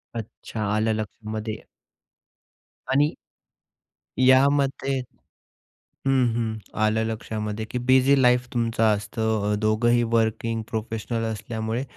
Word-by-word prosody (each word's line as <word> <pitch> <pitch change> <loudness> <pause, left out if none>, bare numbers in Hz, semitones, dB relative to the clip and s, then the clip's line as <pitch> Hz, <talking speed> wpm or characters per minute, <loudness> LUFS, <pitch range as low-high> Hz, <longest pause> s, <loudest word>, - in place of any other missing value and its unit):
अच्छा. 110 0 -6
आलं 110 +1 +1
लक्षामध्ये. 110 0 -5 1.3
आणि 145 +3 +3 1.1
या 130 +1 +6
मते 135 -1 0 1.1
हं, 130 -2 +4
हं. 110 -2 -1 0.2
आलं 110 +1 +2
लक्षामध्ये 110 -1 -4
की - - -2
बिझी 130 +2 +5
लाईफ 125 0 +4
तुमचं 115 -1 0
असतं 105 0 -1
अ, - - +2
दोघंही 120 +3 +3
वर्किंग 115 0 +1
प्रोफेशनल 115 +1 -3
असल्यामुळे, 110 +3 -3
115 Hz, 100 wpm, -24 LUFS, 110-125 Hz, 1.3 s, या